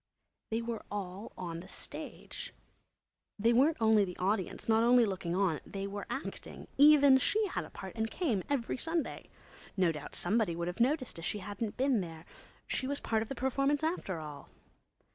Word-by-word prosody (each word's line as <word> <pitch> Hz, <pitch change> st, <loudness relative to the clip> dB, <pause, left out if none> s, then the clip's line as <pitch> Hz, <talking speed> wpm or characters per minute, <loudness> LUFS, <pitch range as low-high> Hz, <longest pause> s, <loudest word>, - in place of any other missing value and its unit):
They 225 Hz, +1 st, -1 dB
were 230 Hz, -1 st, -3 dB
all 200 Hz, +1 st, -5 dB
on 170 Hz, -2 st, -4 dB
the 180 Hz, -, -10 dB
stage. -, -, -8 dB, 0.8 s
They 225 Hz, +3 st, +3 dB
weren't 285 Hz, +7 st, +4 dB
only 220 Hz, -2 st, +5 dB
the 180 Hz, -2 st, -5 dB
audience, 190 Hz, 0 st, -1 dB
not 225 Hz, 0 st, +4 dB
only 240 Hz, 0 st, +6 dB
looking 180 Hz, -4 st, -2 dB
on; 185 Hz, -5 st, +2 dB
they 195 Hz, 0 st, -5 dB
were 200 Hz, +1 st, -5 dB
acting. -, -, -6 dB
Even 285 Hz, -2 st, +8 dB
she 430 Hz, +10 st, +2 dB
had 385 Hz, -, -3 dB
a -, -, -12 dB
part -, -, -8 dB
and 220 Hz, -1 st, -1 dB
came 250 Hz, -, 0 dB
every 265 Hz, -5 st, 0 dB
Sunday. 325 Hz, +3 st, -2 dB, 0.5 s
No 180 Hz, -3 st, +4 dB
doubt 150 Hz, -2 st, -7 dB
somebody 200 Hz, -2 st, +2 dB
would 170 Hz, 0 st, -2 dB
have 180 Hz, +4 st, -4 dB
noticed 255 Hz, -, +1 dB
if 165 Hz, -, -5 dB
she -, -, -1 dB
hadn't 205 Hz, +2 st, -5 dB
been 260 Hz, -4 st, +3 dB
there; 165 Hz, -2 st, -8 dB, 0.4 s
she 260 Hz, -, -2 dB
was 285 Hz, +1 st, -1 dB
part 220 Hz, -1 st, 0 dB
of 220 Hz, -, -4 dB
the 275 Hz, -, -4 dB
performance 275 Hz, +3 st, +1 dB
after 315 Hz, -, -1 dB
all. 150 Hz, -2 st, -8 dB
220 Hz, 180 wpm, -32 LUFS, 185-265 Hz, 0.8 s, Even